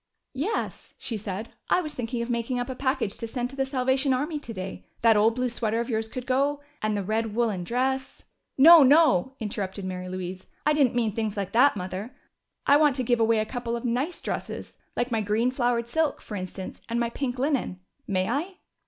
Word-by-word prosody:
"Yes," 315 +12 -3
she 235 - -4
said. 210 +1 -5 0.2
"I - - +4
was 305 -3 -5
thinking 240 -1 -3
of 235 - -6
making 235 +2 -1
up 245 +1 -2
a - - -5
package 260 -6 -1
to 230 - -4
send 245 +2 -3
to - - -10
the 270 -1 0
Salvation 265 0 +2
Army 300 +4 -2
today. 195 -8 -7 0.2
That 225 -1 +6
old 220 +2 +4
blue 255 0 0
sweater 230 -2 -1
of 235 +1 -2
yours 220 0 0
could 250 +2 -6
go, 275 +3 +1 0.2
and 215 -1 0
the 200 - -1
red 215 +2 -1
woolen 220 -6 0
dress 260 +6 -1 0.2
" - - -53
"No! 335 -1 +11
No!" 270 - +5
interrupted 200 -3 -4
Mary 185 -1 -5
Louise. 185 0 -6 0.2
"I 300 - +4
didn't 275 -5 +3
mean 230 -3 +1
things 215 -2 -2
like 195 -1 -2
that, 250 +1 +5
Mother. 190 +7 -5 0.5
I 285 - +6
want 295 -3 +4
to 255 - -1
give 240 0 +2
away 225 0 +3
a 215 - +1
couple 240 0 -3
of 235 - -5
nice 255 +9 -1
dresses. - - -5 0.2
Like 240 +1 -1
my 225 -2 +1
green 215 +4 +1
flowered 240 -2 0
silk, 315 +3 0
for - - -10
instance, 185 0 -6
and 235 +1 0
my 235 -1 0
pink 255 0 -3
linen. 265 -8 0 0.3
May 185 -2 0
I?" 315 +11 -2
235 Hz, 215 wpm, -26 LUFS, 215-265 Hz, 0.5 s, No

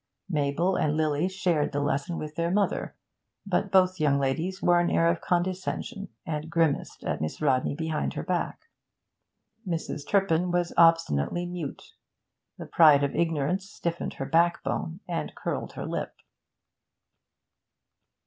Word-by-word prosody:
Mabel 155 +4 +1
and 150 0 +1
Lily 155 +2 +1
shared 175 -7 0
the 145 - 0
lesson 145 +3 -1
with 150 0 -5
their 170 +1 -1
mother, 200 +2 0 0.5
but 200 0 0
both 185 -1 +4
young 145 -2 +3
ladies 160 +8 -1
wore 175 -3 +4
an 175 - +2
air 165 - +3
of 170 0 +1
condescension, 185 +4 -2 0.2
and 155 0 -4
grimaced 165 -4 0
at - - -2
Miss 80 - -3
Rodney 135 -2 +1
behind 160 0 -2
her - - -3
back. - - -3 1.0
Mrs. 165 -4 -3
Turpin 180 -3 +2
was 175 0 0
obstinately 165 - +3
mute. 175 -5 -6 0.6
The - - -7
pride 150 -4 +6
of 140 - -1
ignorance 170 +4 0
stiffened 170 -5 -4
her 135 - -4
backbone 170 +3 0
and 170 -2 -3
curled - - -4
her - - -5
lip. - - -4
165 Hz, 140 wpm, -27 LUFS, 150-180 Hz, 1.0 s, pride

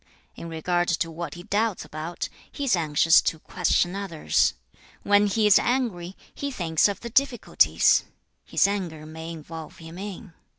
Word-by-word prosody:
In 170 - -8
regard 175 +2 -1
to 165 0 0
what 165 -2 -6
he 175 - -9
doubts 210 +1 -1
about, 160 +3 -5 0.2
he 285 - -5
is 255 -7 +3
anxious 160 0 +4
to 165 - -1
question 175 +2 0
others. 170 - 0 0.5
When 205 0 +4
he 215 +2 +1
is 210 - +7
angry, 210 -8 -1 0.2
he 285 - -4
thinks 170 - +2
of 200 - -4
the 235 - -7
difficulties 265 -2 +3 0.4
(his - - +2
anger 175 -6 -4
may 160 +1 -8
involve 160 0 -9
him 165 +2 -10
in). 200 -1 -8
175 Hz, 160 wpm, -25 LUFS, 160-205 Hz, 0.5 s, is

